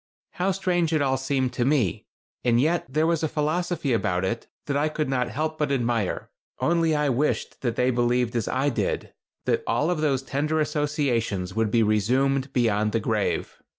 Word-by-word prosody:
How 185 +2 0
strange 175 -3 0
it 155 - +2
all 135 -1 +2
seemed 130 -1 -1
to 120 - 0
me, 125 - +1 0.4
and 120 -1 +3
yet 160 +5 +1
there 155 +3 +2
was 165 -1 +1
a 160 - +1
philosophy 155 -1 -1
about 90 -4 0
it 115 +5 -3 0.2
that 140 - -2
I 145 +2 +2
could 155 0 -2
not 125 -2 0
help 155 +2 -3
but 150 -2 0
admire. 120 -6 -1 0.3
Only 165 -1 +2
I 150 0 +1
wished 135 +4 -1
that 120 -3 -1
they 125 +1 +2
believed 120 0 +1
as 115 -3 0
I 135 +3 +1
did, 125 - -2 0.3
that - - +1
all 155 +4 +1
of 165 -4 -1
those 135 -4 +1
tender 150 +4 -1
associations 135 - 0
would 110 -1 +1
be 115 +1 +3
resumed 130 +6 +1
beyond 110 -4 +1
the 115 - +2
grave. 110 -1 -1
135 Hz, 185 wpm, -25 LUFS, 120-155 Hz, 0.4 s, and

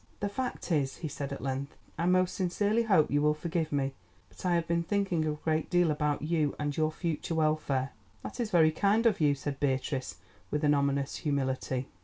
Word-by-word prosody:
"The 205 - -1
fact 250 -3 -4
is," 140 -4 +1
he 160 - -4
said 140 -1 -5
at 140 - -6
length, 135 +1 -3 0.2
"I 170 - -1
most 185 0 +3
sincerely 205 +5 +1
hope 195 -9 +3
you 145 +1 +3
will 150 0 +3
forgive 165 0 -2
me, 140 -2 0 0.4
but - - -14
I 175 - +3
have 170 -1 0
been 170 0 +1
thinking 185 -3 0
a 155 - 0
great 155 +1 -1
deal 175 -3 +3
about 150 -1 0
you 155 -2 +1
and 145 -1 -2
your 155 0 +1
future 165 0 -3
welfare." 155 -4 +1 0.3
"That - - -7
is 235 -3 -1
very 160 -5 +5
kind 205 +7 +2
of 220 -7 +3
you," 145 -2 +4
said 140 0 -5
Beatrice, 135 -1 -1 0.3
with 150 +1 -1
an 150 0 +5
ominous 140 -1 0
humility. 130 -3 -1
155 Hz, 205 wpm, -30 LUFS, 140-175 Hz, 0.4 s, very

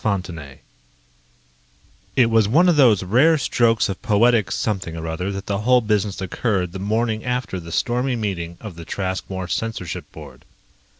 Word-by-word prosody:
_ 85 -9 -3 1.6
It 125 - +5
was 110 -2 +4
one 165 - +4
of 175 - +4
those 115 -10 +5
rare 135 - +4
strokes 115 -5 +2
of 95 - -5
poetic 110 -3 +3
something 95 -6 -2
or 80 - -5
other 80 +4 -3
that 100 0 -6
the 100 -1 -2
whole 125 +3 +4
business 105 -3 -1
occurred 95 -2 -1
the 95 - -7
morning 110 +2 -1
after 125 -6 -2
the 85 -1 -10
stormy 125 +7 0
meeting 90 -6 -4
of 105 -7 -9
the 85 - -8
Traskmore 95 0 -4
censorship 110 -3 -4
board. - - -12
105 Hz, 160 wpm, -21 LUFS, 95-120 Hz, 1.6 s, It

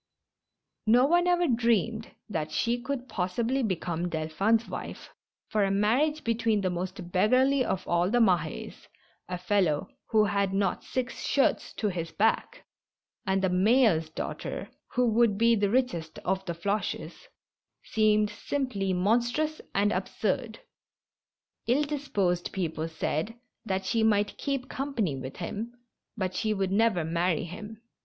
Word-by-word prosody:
No 245 +4 +6
one 350 +4 +3
ever 350 -1 +3
dreamed 230 - +1 0.2
that 160 -7 -3
she 240 +1 0
could 260 -1 -4
possibly 230 +8 -1
become 175 -5 -2
Delphin's 185 +9 +1
wife, - - -7 0.4
for 210 -1 +2
a 195 - +2
marriage 245 +11 +2
between 230 -2 +1
the 185 -2 0
most 180 0 -5
beggarly 255 +8 +3
of 190 -5 -2
all 175 +1 +2
the 240 - +2
Mahes 175 -8 0 0.2
— - - -34
a 180 - -2
fellow 180 -4 +1 0.2
who 215 -1 +4
had 200 -1 0
not 195 -2 0
six 255 -1 -3
shirts 275 - +2
to 210 - -1
his 170 -3 -4
back 225 - 0 0.3
— - - -59
and 190 0 +1
the 190 - +3
mayor's 185 -3 +3
daughter, 160 - -5 0.2
who 250 - +3
would 225 -2 +3
be 230 +1 +4
the 205 -2 +1
richest 215 -10 0
of 190 +1 0
the 170 - -2
Floches, 200 +5 -3 0.6
seemed 215 -1 +2
simply 210 -5 -2
monstrous 240 +11 +1
and 205 +1 +3
absurd. 215 +4 -2 1.1
Ill 260 +5 +3
disposed 205 - -1
people 165 -4 -2
said 160 +5 -2 0.3
that 190 0 -1
she 225 +4 +1
might 210 -2 +2
keep 275 -3 -2
company 240 - -2
with 130 0 -7
him, 220 +7 -5 0.4
but 185 -3 -1
she 215 +3 0
would 195 -1 -1
never 200 -5 +2
marry 170 0 0
him. 210 +6 -9
210 Hz, 145 wpm, -28 LUFS, 180-235 Hz, 1.1 s, No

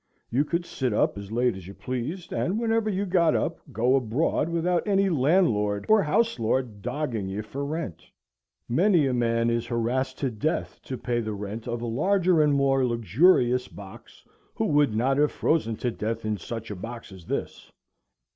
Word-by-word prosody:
You 130 +5 +3
could 170 +3 -1
sit 130 -8 -2
up - - +2
as 100 0 -8
late 120 0 +1
as 95 -2 -10
you 100 - -10
pleased, 130 +8 -5
and, 195 +6 0
whenever 225 -1 +1
you 200 0 -1
got 175 -3 +3
up, 165 - -1
go 125 +2 +2
abroad 135 +6 0
without 170 +3 0
any 195 -1 +3
landlord 130 - +2
or 215 -1 +5
house 225 - +1
lord 115 -2 -1
dogging 125 -5 -3
you 100 +3 -4
for 135 +6 -5
rent. 145 - -4 0.7
Many 170 - +3
a 130 - 0
man 115 -1 +1
is 115 0 -1
harassed 125 +3 -1
to 135 -3 -1
death 150 +10 -2
to 130 - -4
pay 120 -1 -1
the 110 -2 -3
rent 105 +3 -6
of 120 0 -3
a - - -2
larger 175 - +2
and 150 -1 +3
more 135 -1 +2
luxurious 125 - +3
box 95 -2 -13 0.3
who - - 0
would 145 -6 +2
not 135 +5 +1
have 150 0 +3
frozen 115 -9 0
to 120 +2 -2
death 115 0 -4
in 110 0 0
such 115 +2 -6
a - - -4
box 115 +4 -8
as 95 -3 -12
this. - - -4
125 Hz, 185 wpm, -26 LUFS, 115-160 Hz, 0.7 s, or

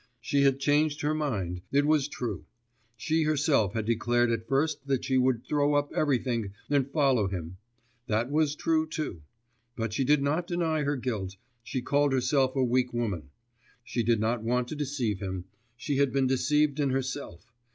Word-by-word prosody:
She 140 +5 +1
had 135 -1 +3
changed 145 +1 +2
her 150 +1 +1
mind, 100 - -2
it 145 +1 +3
was 150 -2 +3
true; 125 -5 -5 0.5
she 160 +7 0
herself 145 - +2
had 110 -2 -1
declared 120 +1 +2
at 115 -1 -2
first 140 +1 0
that 135 -2 0
she 130 - 0
would 125 -2 +1
throw 145 0 +1
up 145 0 +1
everything 120 -8 0 0.2
and 140 -2 +2
follow 135 -8 +2
him; 90 -2 -5 0.5
that 115 +4 0
was 150 -1 +2
true 160 0 +1
too; 155 - -4 0.5
but 115 -2 -3
she 135 - +1
did 140 +1 +3
not 155 +5 0
deny 165 -3 0
her 145 0 0
guilt, 110 -7 -3 0.3
she 130 +1 -4
called 145 +1 +2
herself 130 +1 +2
a 135 - +2
weak 125 0 +1
woman; 100 - -2 0.5
she 120 - -2
did 115 -1 +2
not 115 +2 0
want 125 +2 0
to - - -4
deceive 130 -9 -2
him, 95 -2 -4 0.3
she 140 +3 -2
had 140 -2 +3
been 135 +1 +2
deceived 150 +3 +2
in 140 -2 +2
herself.... 130 -6 -4
135 Hz, 180 wpm, -28 LUFS, 115-145 Hz, 0.5 s, had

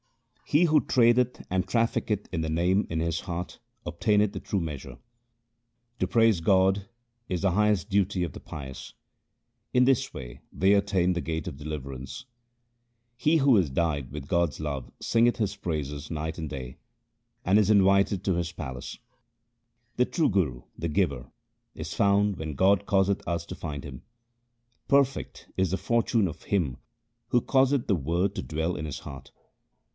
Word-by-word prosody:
He 150 +4 +3
who 155 -3 +4
tradeth 125 0 +2
and 95 +1 0
trafficketh 115 -3 0
in 80 - 0
the 80 - -2
Name 90 +5 +2
in 80 - -2
his 85 0 -1
heart 90 -1 -5 0.3
obtaineth 105 +4 +1
the - - -4
true 100 - -2
treasure. 75 -5 -6 1.0
To - - +1
praise 115 -6 +3
God 95 +3 +3 0.4
is 90 0 -2
the 95 - +3
highest 105 0 +2
duty 100 -2 +1
of 85 - -4
the - - -9
pious: 65 -4 -8 0.8
In 125 0 +5
this 135 0 +2
way 65 0 -9
they 95 +2 +3
attain 95 -3 +2
the 85 - -2
gate 80 -1 -3
of - - -5
deliverance. 70 - -7 0.9
He 155 +7 +3
who 135 -4 +5
is 90 -7 +2
dyed 70 -3 -1
with 70 -1 -7
God's 85 -4 0
love 70 -4 -4
singeth 120 +1 +2
His 105 -3 -1
praises 75 -7 -4
night 80 0 -3
and 80 -2 -4
day, 65 -3 -7 0.7
and 95 +3 +4
is 105 -1 +2
invited 100 -2 +4
to 95 - +2
His 85 -1 -2
palace. 65 -8 -7 1.0
The 125 - +3
true 165 +3 +1
Guru, 75 - 0
the 85 - -3
giver, 75 -7 -1 0.4
is - - -6
found 100 -1 +2
when 80 -2 -5
God 100 +6 +3
causeth 100 -1 +2
us 85 -1 -2
to - - -7
find 75 -4 -6
him. 65 -4 -9 0.9
Perfect 140 -1 +1
is 95 -2 +1
the 95 - +1
fortune 115 0 +1
of 80 - -8
him 80 -11 0 0.5
who 120 - +3
causeth 135 +1 +2
the 100 - +3
Word 85 +5 0
to - - -2
dwell 80 +3 -2
in 75 - -5
his 75 -3 -5
heart. 65 -2 -10
90 Hz, 165 wpm, -27 LUFS, 75-105 Hz, 1.0 s, In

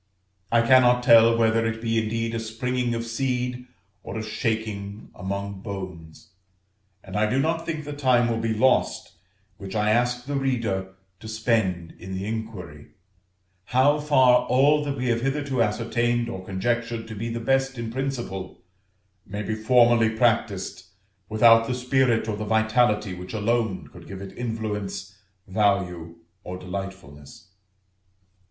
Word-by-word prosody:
I 115 0 +4
cannot 125 0 +5
tell 115 -1 +7
whether 115 0 +3
it 115 0 -2
be 115 0 0
indeed 115 +1 -2
a 115 - -1
springing 120 +2 -2
of 115 0 -3
seed 125 +1 -2 0.3
or 110 - -7
a 110 - -3
shaking 110 -2 -3
among 100 +1 -5
bones; 95 -4 -8 0.7
and 95 0 -9
I 105 0 +2
do 130 - 0
not 165 +3 -1
think 155 -2 -3
the 145 - -5
time 130 -4 +3
will 115 -1 -1
be 115 0 -1
lost 130 +4 +2 0.5
which 100 -1 -8
I 105 0 +2
ask 120 +2 +1
the 145 - -4
reader 110 -8 -2 0.2
to 110 - -10
spend 110 -6 0
in 95 +2 -7
the 95 +1 -4
inquiry, 105 -9 -6 0.8
how 135 +4 +3
far 130 -4 +4
all 145 +4 +4
that 140 -1 -3
we 125 - -3
have 115 0 +1
hitherto 135 -1 -1
ascertained 120 +2 0
or 95 -5 -6
conjectured 115 +4 -2
to 110 - -7
be 110 +3 -4
the 115 0 -3
best 135 +2 0
in 115 -1 -4
principle, 120 -9 -4 0.6
may 100 +1 -4
be 110 - -2
formally 115 0 +4
practised 110 -5 0 0.5
without 115 +1 +5
the 125 - -1
spirit 125 -2 +1
or 110 - -1
the 110 - -4
vitality 110 -2 +2
which 90 +3 -8
alone 110 -2 0
could - - -13
give 95 - -8
it 100 0 -9
influence, 105 -4 -4 0.3
value, 95 -4 0 0.3
or 90 0 -6
delightfulness. 90 -5 -8
115 Hz, 150 wpm, -25 LUFS, 100-125 Hz, 0.8 s, tell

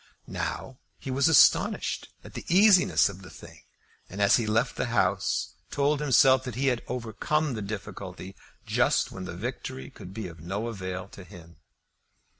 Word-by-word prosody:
Now 130 -1 -5 0.2
he 135 - -6
was 135 +3 +2
astonished 160 - +3
at - - -12
the - - -7
easiness 190 0 +5
of 100 -1 -8
the 90 - -12
thing, - - -13 0.5
and 95 - -8
as 100 -1 +5
he 115 -3 -2
left 110 +4 +1
the - - -2
House 95 -5 0 0.2
told 145 +1 +1
himself 130 -2 +5
that 125 -4 -5
he 135 +2 +1
had 125 -2 -1
overcome 125 +5 -2
the 110 - -4
difficulty 100 -2 -7 0.3
just - - +1
when 95 -1 -7
the 85 -2 -7
victory 130 +5 -6
could 95 -8 -11
be 110 -1 -6
of 85 -2 -12
no 95 +7 -4
avail 95 -4 -5
to 95 - -12
him. 85 -4 -14
110 Hz, 170 wpm, -27 LUFS, 95-130 Hz, 0.5 s, easiness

